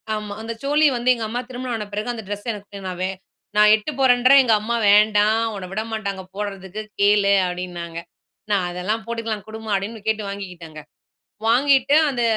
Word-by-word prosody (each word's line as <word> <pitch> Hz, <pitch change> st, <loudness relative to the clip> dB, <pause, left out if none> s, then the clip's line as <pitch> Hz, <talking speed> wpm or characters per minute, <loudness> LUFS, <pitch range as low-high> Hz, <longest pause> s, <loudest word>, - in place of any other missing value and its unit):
ஆமா. 210 Hz, -1 st, -5 dB
அந்த 230 Hz, +1 st, -5 dB
சோலி 295 Hz, +2 st, +3 dB
வந்து, 245 Hz, +2 st, 0 dB
எங்க 230 Hz, -2 st, -4 dB
அம்மா 245 Hz, +2 st, -2 dB
திருமணம் 250 Hz, -1 st, -4 dB
ஆன 215 Hz, -2 st, -4 dB
பிறகு, 210 Hz, +3 st, -3 dB
அந்த 225 Hz, -2 st, -7 dB
ட்ரெஸ்ஸ 205 Hz, +3 st, -6 dB
எனக்கு, 205 Hz, -1 st, -10 dB
நான் 180 Hz, -1 st, -5 dB
வே 185 Hz, -, +1 dB, 0.5 s
நான் 210 Hz, 0 st, +7 dB
எடுத்துட்டு 220 Hz, +8 st, -4 dB
போறேன்றேன். 255 Hz, +1 st, +6 dB
எங்க 230 Hz, -, +3 dB
அம்மா, 230 Hz, +3 st, -2 dB
"வேண்டாம். 210 Hz, +2 st, +4 dB
உன்ன 185 Hz, -2 st, -6 dB
விடமாட்டாங்க 215 Hz, -2 st, -4 dB
போடுறதுக்கு. 200 Hz, 0 st, -5 dB, 0.2 s
கேளு." 200 Hz, 0 st, +4 dB
அப்படின்னாங்க. 175 Hz, -2 st, -5 dB, 0.5 s
நா, 205 Hz, -, +4 dB
அதெல்லாம் 190 Hz, +6 st, -3 dB
போட்டுக்கலாம் 230 Hz, -3 st, -4 dB
குடுமா 220 Hz, 0 st, -8 dB
அப்படின்னு 210 Hz, +3 st, -4 dB
கேட்டு 220 Hz, -1 st, 0 dB
வாங்கிக்கிட்டேங்க. 175 Hz, -6 st, -8 dB, 0.7 s
வாங்கிட்டு 270 Hz, +3 st, +4 dB
அந்த 250 Hz, -3 st, -2 dB
215 Hz, 165 wpm, -22 LUFS, 200-230 Hz, 0.7 s, நான்